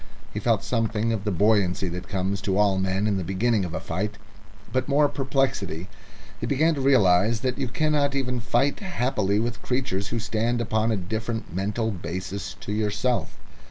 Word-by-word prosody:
He - - -2
felt - - +1
something 115 -1 0
of 105 -2 -3
the 105 - +1
buoyancy 100 -1 +2
that 90 +1 -6
comes 95 0 -1
to 100 -1 0
all 100 -2 +3
men 95 +2 0
in 105 -2 +1
the 95 - -2
beginning 100 +4 +1
of 85 -1 -5
a - - -1
fight, 100 +5 -3 0.6
but 130 0 +1
more 145 +1 +5
perplexity. 130 - -1 0.5
He 115 - -3
began 155 +6 +3
to 140 - -3
realise 110 -4 +4
that 130 +1 -1
you 135 - 0
cannot 145 +2 +1
even 125 -2 0
fight 120 +4 +1
happily 125 - 0
with 120 +1 -2
creatures 125 -6 -1
who 115 - -2
stand 115 +1 0
upon 110 0 +1
a 110 - +1
different 110 +2 -4
mental 105 +5 -1
basis 90 +2 -5
to 105 - -5
yourself. 105 -2 0
110 Hz, 180 wpm, -25 LUFS, 95-125 Hz, 0.6 s, more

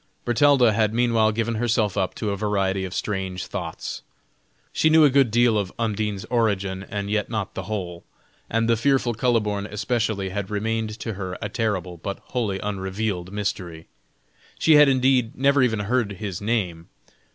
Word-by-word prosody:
Bertalda 125 -1 +4
had 110 0 +1
meanwhile 115 -2 +3
given 115 +2 -1
herself 110 -4 +1
up 95 -3 -1
to 105 - -2
a - - -1
variety 95 -2 0
of 90 - -7
strange 95 -3 -3
thoughts. - - -5 0.7
She 160 - +3
knew 160 0 +6
a 145 - +4
good 135 -2 +4
deal 115 -1 +3
of 95 -2 -3
Undine's 105 -3 -2
origin, 100 -5 0
and 100 0 -3
yet 105 -1 0
not 110 -4 -3
the 95 - -5
whole, 90 -5 -4 0.5
and 115 0 +1
the 115 - +4
fearful 130 0 +1
Kuhleborn 105 -4 0
especially 105 -3 -1
had 95 0 -4
remained 110 +1 -2
to 115 - -3
her 95 -2 -5
a 105 - -4
terrible 100 -6 -2
but 100 +4 -5
wholly 110 -6 -1
unrevealed 95 -2 -3
mystery. 90 -5 -4 0.7
She 160 - +4
had 150 -1 +7
indeed 130 -3 +2
never 140 +1 +3
even 110 -4 +1
heard 110 0 0
his 100 -2 -5
name. 95 -7 -2
105 Hz, 165 wpm, -24 LUFS, 95-115 Hz, 0.7 s, had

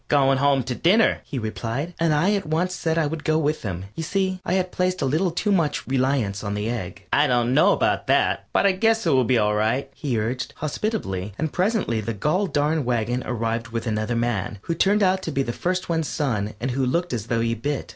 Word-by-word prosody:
"Goin' 135 -2 +3
home 140 -1 +3
to 130 - -3
dinner," 195 - +3
he 145 - -5
replied, 115 +7 -3
and 165 -1 +2
I 170 +7 +3
at 200 -4 -2
once 170 +4 0
said 165 -2 -1
I 165 - +2
would 150 +1 -4
go 155 0 +2
with 155 0 0
him. 95 -3 -4
You - - -5
see, 190 +2 -1
I 175 - -1
had 185 -1 0
placed 185 0 0
a - - +2
little 160 +8 +1
too 195 +5 -1
much 165 -6 +1
reliance 130 -7 0
on 100 -1 -2
the 105 +3 -2
egg. 100 -4 -6
"I 145 +1 +4
dunno 125 +4 +3
about - - +1
that, - - +2
but - - +2
I 200 - +6
guess 225 +4 +1
it - - +3
will 130 -2 +4
be 125 +1 +3
all 105 -1 +2
right," 110 +6 0
he 135 -6 -2
urged, 120 +4 -3
hospitably, 145 - -3
and 160 -1 -2
presently 185 - 0
the 110 +1 -4
goll 180 - +1
darned 150 -1 +1
wagon 120 0 0
arrived 115 -1 -2
with 115 0 -4
another 110 +1 -1
man, 115 -4 -1
who 170 - -2
turned 200 +5 +3
out 190 0 +2
to - - -4
be 135 - 0
the 120 - -3
first 185 +5 -2
one's 165 -2 0
son 110 -8 -2
and 130 +3 -2
who 130 +2 -1
looked 170 +7 0
as 115 -2 -3
though 115 -1 0
he 115 0 +1
bit. 135 +5 -3
140 Hz, 235 wpm, -23 LUFS, 115-170 Hz, -, I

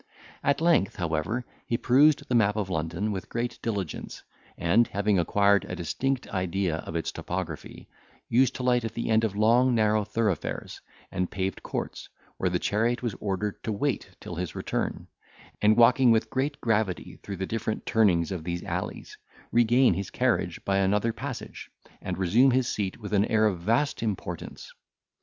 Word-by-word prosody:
At 140 +2 +2
length, 165 - +3
however, 85 +8 -2 0.2
he 115 - 0
perused 140 +5 +4
the - - -2
map 105 -3 +3
of 100 -3 -2
London 85 +5 -2
with 95 -2 -5
great 120 +1 -3
diligence, 100 -8 -4 0.3
and, 100 +8 +3
having 100 -1 +1
acquired 100 +4 +3
a - - -5
distinct 125 - -2
idea 95 -3 -1
of 80 - -7
its 85 - -1
topography, 85 -4 -6 0.4
used 130 +2 +3
to 125 - -4
alight 125 -1 +2
at 115 - -5
the 115 - -2
end 110 0 +4
of 105 -3 -1
long 120 +4 +4
narrow 110 -1 +3
thoroughfares 105 -5 -2 0.3
and 90 0 -1
paved 95 0 -3
courts, - - -5 0.3
where 90 - 0
the 90 - +1
chariot 115 +6 0
was 120 -4 -1
ordered 100 0 -3
to 110 - -2
wait 125 +6 -1
till - - -8
his 90 0 -4
return; - - -3 0.5
and, 105 +1 +4
walking 125 +2 +6
with 115 -1 +2
great 140 +3 -1
gravity 110 -5 -1
through 100 -1 -6
the 95 - -2
different 110 +1 -3
turnings 100 -8 +3
of 90 -4 -4
these 85 0 -3
alleys, - - -5 0.3
regain 120 0 +4
his 95 +2 -4
carriage - - 0
by 100 0 +1
another 105 +4 +1
passage, 130 +1 -7 0.3
and - - -4
resume 105 +9 +4
his 130 -1 +2
seat 100 -5 -2
with 105 -1 -7
an 100 0 +4
air 110 -1 +2
of 95 -5 +1
vast 115 +11 0
importance. 105 -4 -5
105 Hz, 170 wpm, -27 LUFS, 95-120 Hz, 0.5 s, walking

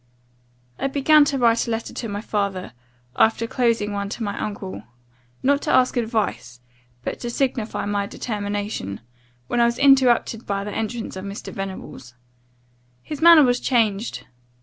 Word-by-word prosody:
"I - - 0
began 290 +2 +5
to 280 -1 -1
write 235 -2 +3
a - - -3
letter 225 0 -3
to 230 - -5
my 205 0 -4
father, 200 - -3 0.4
after 225 +1 +3
closing 230 -4 0
one 200 0 -3
to 225 - -5
my 200 -1 -3
uncle; 195 - -5 0.6
not 280 +2 +3
to 305 - -1
ask 255 +1 +3
advice, 220 - -2 0.4
but - - -4
to 240 - -4
signify 240 -4 -1
my 205 -1 -1
determination; 205 - -4 0.4
when 240 - -1
I - - +6
was 235 0 0
interrupted 255 -4 +3
by 200 -1 -1
the 205 0 -6
entrance 225 0 -4
of 190 +1 -6
Mr. 200 +1 -7
Venables. 190 - -7 0.9
His 300 -1 -7
manner 335 -2 +9
was 245 -1 +2
changed. 225 -3 0
225 Hz, 155 wpm, -22 LUFS, 200-250 Hz, 0.9 s, manner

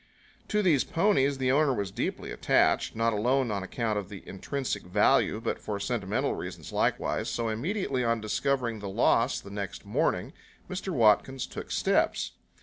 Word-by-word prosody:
To 210 0 +1
these 155 -8 +4
ponies 165 -7 +2
the 130 -1 +1
owner 140 -1 +3
was 100 -3 -3
deeply - - -3
attached, - - +2
not 115 0 +1
alone 125 +3 +1
on 100 -2 -1
account 105 +2 -1
of 100 - -8
the 100 -3 -10
intrinsic 115 +2 -3
value, 105 +3 +2
but 115 - -2
for 105 -2 -4
sentimental 100 -2 -1
reasons - - -7
likewise. - - 0
So 115 -1 -1
immediately 135 - -1
on 115 -1 +1
discovering 115 +1 -1
the 100 -1 -5
loss 115 +4 +2
the 100 - -11
next 100 -2 -5
morning, - - 0 0.3
Mr. 190 +1 -4
Watkins 125 - +3
took - - -8
steps. - - +1
115 Hz, 160 wpm, -28 LUFS, 105-135 Hz, 0.3 s, these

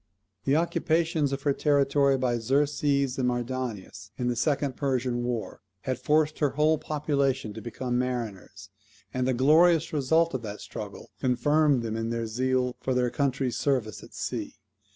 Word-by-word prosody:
The 140 - +3
occupations 160 -2 +1
of 135 0 -3
her 145 - +2
territory 140 -1 +3
by 125 -2 0
Xerxes 140 +1 +1
and 125 - +1
Mardonius, 120 -5 -4
in 125 -1 -1
the 120 - 0
second 140 +2 0
Persian 125 -3 -1
war, 120 -2 -4 0.2
had 130 -2 -3
forced 155 +3 +1
her 145 - +3
whole 155 0 +3
population 140 -6 -1
to 110 - -8
become 120 +2 -2
mariners; 105 -6 -4 0.4
and 125 0 0
the 130 - +1
glorious 160 +5 +4
results 160 +4 +2
of 130 - -2
that 105 -2 -6
struggle - - -8
confirmed 145 +1 +2
them 110 -1 -3
in 115 0 -2
their 115 0 -2
zeal 125 +2 0
for 130 - -1
their 125 -1 +1
country's 135 -1 -1
service 125 -7 0
at - - -14
sea. - - -4
130 Hz, 160 wpm, -27 LUFS, 120-145 Hz, 0.4 s, glorious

